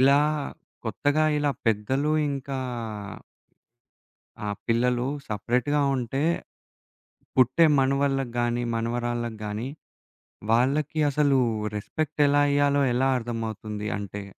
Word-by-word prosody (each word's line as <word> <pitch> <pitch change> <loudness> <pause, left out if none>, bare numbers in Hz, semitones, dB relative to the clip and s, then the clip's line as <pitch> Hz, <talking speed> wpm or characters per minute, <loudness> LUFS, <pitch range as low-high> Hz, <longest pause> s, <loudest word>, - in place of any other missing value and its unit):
ఇలా 140 +2 +6 0.6
కొత్తగా 150 +2 +1
ఇలా 145 -1 +1 0.2
పెద్దలు 130 +8 +1 0.2
ఇంకా 135 -1 -4 1.9
ఆ! - - -2 0.2
పిల్లలు 120 +1 +1 0.2
సెపరేట్‌గా 125 +7 0 0.2
ఉంటే 130 +3 -2 1.1
పుట్టే 130 +6 +5
మనవళ్ళకి 135 -2 +1
గానీ, 120 0 0
మనవరాళ్ళకి 120 0 -2
గానీ 105 +4 -3 0.8
వాళ్ళకి 140 +6 +2
అసలు 140 -1 +3 0.4
రెస్పెక్ట్ 150 +8 -2
ఎలా 145 0 +4
ఇయ్యాలో 145 0 +3
ఎలా 135 +2 +2
అర్థమవుతుంది? 110 -2 -4
అంటే 100 0 -6
130 Hz, 90 wpm, -26 LUFS, 115-140 Hz, 1.9 s, ఇలా